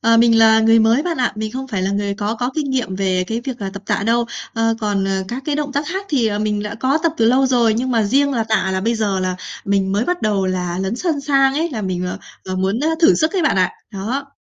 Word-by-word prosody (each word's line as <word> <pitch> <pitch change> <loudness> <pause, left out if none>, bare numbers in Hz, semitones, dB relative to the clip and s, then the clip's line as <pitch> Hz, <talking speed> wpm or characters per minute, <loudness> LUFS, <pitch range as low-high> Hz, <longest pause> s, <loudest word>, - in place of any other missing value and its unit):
Ờ, 230 0 +4
mình 230 0 +5
là 220 0 +6
người 225 +1 +5
mới 225 +5 +3
bạn 340 -1 -2
ạ. 250 - +1
Mình 215 0 -4
không 265 +1 -5
phải 195 -5 -2
là 190 - 0
người 200 0 -1
có 210 +2 -2
có 245 +2 -2
kinh 295 -3 -2
nghiệm 230 -8 -2
về 185 -2 0
cái 225 +3 -3
việc, 255 -1 -6
à, 195 -2 -4
tập 200 - -8
tạ - - 0
đâu. 235 +1 +2 0.3
Ờ, 225 0 +1
còn 200 -2 0 0.2
các 255 +3 -5
cái 295 -1 0
động 290 -2 -3
tác 285 +2 -1
khác 385 +2 -4
thì, 255 -6 +1
à, 205 - -2
mình 210 -1 -1
đã 210 - -5
có 265 +6 +1
tập 330 -2 +2
từ 225 - +2
lâu 260 +3 +4
rồi, 235 -4 +3
nhưng 255 +3 -1
mà 230 -2 +2
riêng 280 +7 +2
là 230 -4 0
tạ 220 -3 0
là 190 - -1
bây 230 +4 0
giờ 205 -4 -1
là 185 0 -2 0.3
mình 195 -1 0
mới 205 +4 +1
bắt 360 +5 -2
đầu 200 -3 +1
là 180 -1 -2
lấn 190 +5 -2
sân 320 -3 -1
sang 275 -1 +2
ấy, 325 +4 -1
là 225 -6 -4
mình, 180 -1 -2 0.4
ờ, 185 0 -4
muốn, 195 +6 0
ơ, 310 - +1
thử 335 - +6
sức 315 0 +1
ấy 375 -4 0
bạn 305 - +2
ạ! 185 -1 +2 0.2
Đó. 235 +8 -3
225 Hz, 285 wpm, -19 LUFS, 200-270 Hz, 0.4 s, là